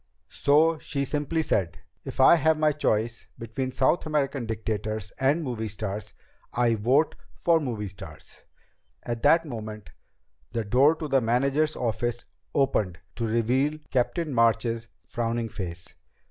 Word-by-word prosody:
So 155 +3 +3
she 140 -1 -2
simply 150 +3 -1
said, 95 - 0 0.3
"If - - -8
I 130 - +8
have 160 +1 +3
my 155 0 +3
choice 115 -5 -1
between 115 +3 -4
South 130 +6 +2
American 140 -5 -1
dictators 110 -2 -3
and 140 +5 +2
movie 120 -5 -3
stars, 105 0 -5 0.4
I 120 -1 +2
vote 125 +8 +2 0.2
for 170 -1 +3
movie 115 -9 -3
stars." 95 - -12 0.6
At 120 -1 -4
that 165 +3 +5
moment 110 -6 -7 0.6
the 115 -2 -1
door 135 +9 +4
to 155 -1 -5
the 135 -2 +3
manager's 140 +6 +1
office 120 0 -2 0.3
opened 110 -10 +1 0.2
to 115 - -2
reveal 125 +7 +1
Captain 145 +4 0
March's 115 0 +2 0.2
frowning 115 -1 -2
face. 85 -4 -7
120 Hz, 135 wpm, -26 LUFS, 110-145 Hz, 0.6 s, I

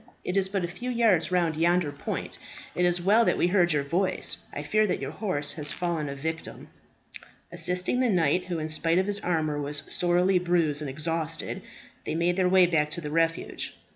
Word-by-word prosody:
"It 180 - -3
is 190 -1 +2
but 195 -3 -1
a - - -3
few 235 +8 -6
yards 225 -9 +2
round 170 -3 +1
yonder 170 -1 +2
point. 145 - -5 0.3
It 180 - +1
is 175 0 +2
well 210 +5 +5
that - - +2
we - - +2
heard 175 -1 +3
your 150 -2 +1
voice. 175 +7 0
I - - -5
fear 215 0 +2
that 180 - -1
your 140 0 -4
horse 155 -5 -1
has 150 -2 -1
fallen 170 -4 -2
a 140 - -5
victim." 160 +3 -5 0.8
Assisting 180 +6 0
the 255 -2 +2
knight, 180 -2 +2
who, 180 -2 -3
in 155 -1 -3
spite 165 +2 +1
of 185 - +2
his 205 0 0
armour, 155 -5 -1
was 145 0 -1
sorely 180 +1 +3
bruised 170 -4 +1
and 150 - -4
exhausted, 160 +2 -2 0.4
they - - -3
made 170 +2 +1
their 185 -1 +2
way 185 -1 +6
back 155 -3 +1
to 170 +2 -2
the 150 -2 -5
refuge. 165 +1 -1
175 Hz, 205 wpm, -27 LUFS, 155-180 Hz, 0.8 s, way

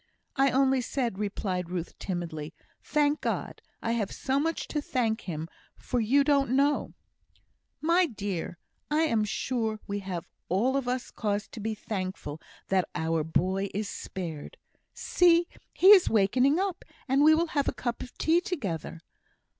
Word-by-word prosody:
"I 275 0 +4
only 265 0 +3
said," 235 -4 -2
replied 190 -4 -2
Ruth, 180 -2 -4
timidly, 165 -5 -4 0.3
"thank 295 0 +1
God! - - -3 0.2
I 230 - 0
have 225 -4 -1
so 270 +1 0
much 325 +2 -1
to 300 - -1
thank 235 -5 0
Him 160 -1 -4 0.3
for, 250 - -2
you 260 +6 +4
don't 275 -3 +2
know." 285 +2 +1 0.9
"My 340 +3 +4
dear, 200 - -4 0.3
I 300 +1 +2
am 230 -10 +2
sure 220 0 -2
we 200 0 -3
have 185 -3 -5 0.2
all 230 +9 +2
of 275 -3 -1
us 250 0 -2
cause 205 -2 -2
to - - -9
be 220 +1 -2
thankful 185 -8 -5 0.3
that 190 -2 +2
our 160 -1 0
boy 185 +5 0
is 210 0 -1
spared. 165 -6 -6 0.4
See! 345 -1 +4 0.2
he 375 - +5
is 390 -4 +8
wakening 250 - +3
up; 385 -2 -2 0.2
and 270 +2 +3
we 315 +1 +7
will 335 +1 0
have 285 -2 +1
a - - +2
cup 240 -2 -4
of 250 - -9
tea 330 +2 +3
together." 190 - -4
230 Hz, 160 wpm, -28 LUFS, 190-285 Hz, 0.9 s, is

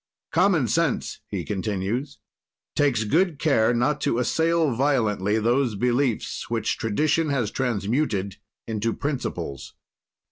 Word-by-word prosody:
"Common 170 -6 +3
sense," 145 +6 0
he - - -4
continues, 105 +7 -2 0.6
"takes 135 -6 +2
good 165 - +2
care 135 -7 +3
not 125 +5 +1
to 140 -5 +1
assail 160 +4 +2
violently 110 -6 +1
those 120 +1 +1
beliefs 125 +2 0
which 115 -1 -1
tradition 150 +8 +1
has 125 -7 0
transmuted 105 -4 -1 0.3
into 110 0 -1
principles. 125 - -4
125 Hz, 110 wpm, -24 LUFS, 110-145 Hz, 0.6 s, Common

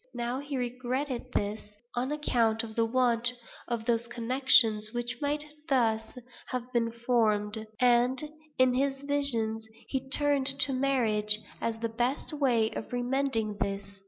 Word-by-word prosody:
Now 240 +2 -2
he 285 -1 -4
regretted 250 +1 -3
this, 210 0 -3 0.2
on 250 +3 -1
account 235 -7 +1
of 220 -1 -8
the 230 -1 +2
want 240 -1 +2 0.4
of 235 -2 -2
those 235 0 +1
connections 235 -3 +3
which 240 +1 -4
might 295 +1 -1 0.2
thus 225 -3 +1 0.3
have 250 0 -5
been 230 -1 +1
formed; 220 -2 0
and, 250 +1 +4 0.4
in 255 -1 +4
his 270 +1 0
visions, 235 -6 +1 0.2
he 265 -1 -3
turned 285 -1 +3
to 270 - +2
marriage 225 -6 +1 0.2
as 230 -1 -1
the 230 +1 -2
best 240 +7 -1
way 245 -7 +2
of - - -6
remedying 245 -4 0
this. 200 0 -3
240 Hz, 140 wpm, -29 LUFS, 225-265 Hz, 0.4 s, and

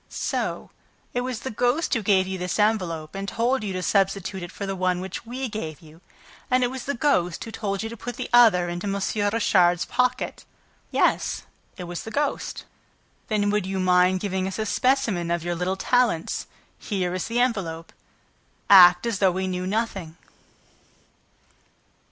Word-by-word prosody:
"So - - -3 0.4
it 245 - 0
was 250 -2 -4
the 265 - -4
ghost 245 +8 +1
who 230 - +1
gave 195 -2 +3
you 190 0 -4
this 180 0 -2
envelope 180 -8 0
and 195 0 -5
told 240 +1 0
you 205 - -3
to 185 0 -3
substitute 195 -1 0
it 175 - -7
for 200 - -6
the 195 0 -3
one 185 -1 0
which 190 +4 -6
we 255 +2 -3
gave 160 - -6
you? 160 +1 -17 0.5
And 255 -1 +3
it 245 - 0
was 260 -1 -6
the 280 - -2
ghost 180 - +1
who 225 - -8
told 200 -1 -3
you 225 - -4
to 230 - -7
put 245 +1 -6
the - - -5
other 215 -8 +6
into 175 +3 -4
M. 200 - -1 0.4
Richard's 180 -5 +3
pocket?" 250 +1 -1 0.5
"Yes, - - +1 0.3
it 180 - -6
was 175 0 -5
the - - -7
ghost." 290 +5 -2 0.6
"Then 205 -2 +1
would 210 -3 0
you 190 0 -2
mind 180 0 +3
giving 190 -2 -1
us 190 - -5
a 220 - -1
specimen 230 -8 +1
of 170 -1 -1
your 175 0 -2
little 180 +3 -2
talents? 240 -8 +1 0.3
Here 185 -4 -2
is 185 - -3
the 235 +1 -1
envelope. 190 -10 -1 0.8
Act 180 0 +8
as 230 -5 -1
though 195 - +5
we 190 +1 -2
knew 185 0 -3
nothing." 195 -6 -3
195 Hz, 180 wpm, -24 LUFS, 180-230 Hz, 0.8 s, Act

